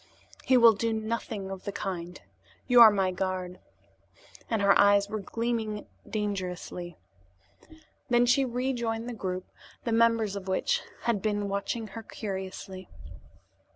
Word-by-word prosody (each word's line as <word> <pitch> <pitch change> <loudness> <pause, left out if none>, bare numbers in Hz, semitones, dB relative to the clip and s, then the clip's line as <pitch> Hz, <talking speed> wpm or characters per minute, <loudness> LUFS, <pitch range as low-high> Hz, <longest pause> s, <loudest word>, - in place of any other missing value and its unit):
"He 260 -1 +4
will 235 -2 +8
do 230 +2 -1
nothing 220 -3 -3
of 190 -1 -7
the 200 - -4
kind. 180 -3 -5 0.5
You 245 -2 +6
are 225 - +12
my 195 -3 +1
guard," 185 -1 -3 0.9
and 225 - +1
her 200 0 +6
eyes 200 0 +5
were 215 +1 -4
gleaming 225 0 -3 0.2
dangerously. 180 -4 -4 1.1
Then 240 0 +4
she 250 +3 +4
rejoined 240 -2 -2
the 245 - -4
group, 185 -4 -4 0.4
the 235 - -2
members 225 -2 +3
of 195 -1 -6
which 485 - +1 0.2
had 230 -4 0
been 205 -1 -1
watching 210 +3 -3
her 225 +4 -7
curiously. 190 -3 -6
210 Hz, 135 wpm, -28 LUFS, 190-230 Hz, 1.1 s, are